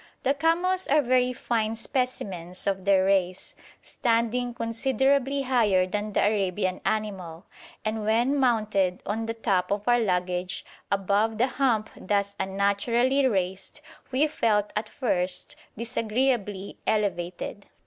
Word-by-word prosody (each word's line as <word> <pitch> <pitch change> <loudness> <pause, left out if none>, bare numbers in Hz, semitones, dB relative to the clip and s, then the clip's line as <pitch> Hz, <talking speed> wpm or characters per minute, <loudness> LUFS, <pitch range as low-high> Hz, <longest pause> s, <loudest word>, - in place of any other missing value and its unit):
The 270 - +3
camels 350 +5 +1
are 295 +1 +4
very 250 0 +3
fine 225 -3 -1
specimens 200 -8 -3
of 195 -1 -1
their 195 -1 +4
race, 185 -2 0 0.3
standing 235 +1 0
considerably 265 +4 +1
higher 220 -8 +3
than 210 +2 -3
the - - +3
Arabian 190 -2 0
animal, 195 -5 -3 0.4
and 215 0 -2
when 235 +6 +2
mounted 215 -7 +1
on 220 +3 -2
the 230 - -3
top 195 -5 0
of 205 +2 -2
our 240 0 +5
luggage, 180 -3 -1 0.3
above 200 +3 +1
the 240 - +4
hump 250 -5 0
thus 200 +1 -1
unnaturally 230 +8 +2
raised, 190 +4 -2 0.3
we 265 +4 +3
felt 215 -8 +1
at 215 0 -2
first 180 -7 -2 0.2
disagreeably 225 -3 -1
elevated. 200 -2 -2
215 Hz, 125 wpm, -26 LUFS, 195-245 Hz, 0.4 s, our